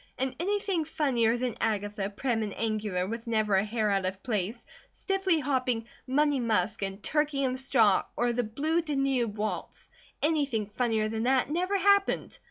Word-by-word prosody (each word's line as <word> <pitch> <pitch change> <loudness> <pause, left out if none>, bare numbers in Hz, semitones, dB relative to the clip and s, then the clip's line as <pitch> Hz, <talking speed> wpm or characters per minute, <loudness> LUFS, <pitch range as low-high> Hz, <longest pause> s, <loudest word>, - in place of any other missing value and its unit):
And 265 0 -1
anything 395 -1 0
funnier 245 -7 +1
than 245 -2 -2
Agatha, 205 -2 -1
prim 225 +2 -1
and 210 -2 -4
angular 215 -5 -1
with 230 +4 -5
never 215 -2 +1
a 190 0 +4
hair 215 -1 0
out 195 -1 +1
of 190 +1 -5
place, 215 -2 -2 0.2
stiffly 385 -4 0
hopping 255 -5 0 0.2
"Money 290 +1 +2
Musk" 220 -3 0
and 195 +1 -4
"Turkey 295 -2 +1
In 260 - +1
The 255 - -3
Straw," 230 -7 +3
or 240 0 +1
the 245 - +1
"Blue 295 +9 0
Danube" 270 -8 0
waltz, 215 +1 -4 0.3
anything 285 -8 +1
funnier 225 -3 +1
than 220 0 -3
that, 260 +2 +2
never 365 +5 +1
happened. 400 +1 +2
240 Hz, 170 wpm, -29 LUFS, 215-290 Hz, 0.3 s, a